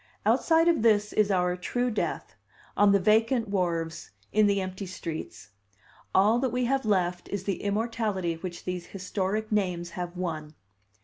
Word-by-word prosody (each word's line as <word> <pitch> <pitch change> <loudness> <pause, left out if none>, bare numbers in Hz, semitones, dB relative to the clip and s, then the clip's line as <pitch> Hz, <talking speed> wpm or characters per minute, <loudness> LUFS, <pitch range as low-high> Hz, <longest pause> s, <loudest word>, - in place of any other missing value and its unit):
Outside 330 0 +4
of 335 -6 +3
this 210 -2 +3
is 210 -1 +3
our 180 -2 +1
true 245 +7 -1
death, 215 - -3 0.4
on 205 0 +5
the 200 - +5
vacant 225 +4 +3
wharves, 170 -4 -2 0.2
in 215 0 +5
the 200 -1 +2
empty 185 +1 -5
streets. 165 -10 -7 0.7
All 210 +5 +5
that 260 0 +1
we 250 +1 0
have 270 0 0
left 180 -3 0
is 200 -2 -3
the 195 -1 -2
immortality 205 -4 -1
which 175 +1 -7
these 180 -1 -4
historic 195 +3 -2
names 180 -5 -1
have 175 0 -5
won." 155 -4 -4
200 Hz, 160 wpm, -27 LUFS, 180-220 Hz, 0.7 s, on